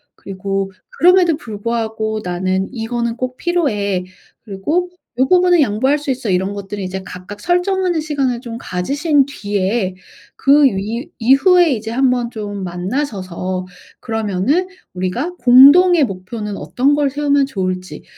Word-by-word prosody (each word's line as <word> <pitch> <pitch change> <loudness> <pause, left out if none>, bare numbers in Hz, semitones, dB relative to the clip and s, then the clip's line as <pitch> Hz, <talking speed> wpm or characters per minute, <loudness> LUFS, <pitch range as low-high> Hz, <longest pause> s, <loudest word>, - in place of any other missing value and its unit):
그리고 195 0 -4 0.3
'그럼에도 355 -1 +5
불구하고 220 -2 -3
나는 185 +2 -1
이거는 235 0 -3
꼭 255 0 -4
필요해.' 210 - -1 0.4
그리고 295 - -2 0.3
'요 265 - +3
부분은 360 -2 +4
양보할 260 +5 +1
수 290 -1 -7
있어.' 250 -4 -3
이런 190 +2 0
것들은 200 0 -6
이제 190 +1 -4
각각 185 +3 -9
설정하는 355 -1 +1
시간을 275 -6 -1
좀 235 -2 -7
가지신 280 - 0
뒤에 205 -5 -2 0.4
그 285 +2 +4
위 230 - -1
이후에 315 - +5
이제 220 -1 -5
한번 250 -1 +1
좀 205 -3 -6
만나셔서 185 -2 -3 0.3
그러면은 225 - -1 0.3
우리가 215 - -3
공동의 285 +7 +7
목표는 205 +2 -6
어떤 275 +3 +1
걸 290 -2 +1
세우면 285 0 +1
좋을지 185 - -4
235 Hz, 300 characters per minute, -17 LUFS, 195-285 Hz, 0.4 s, 공동의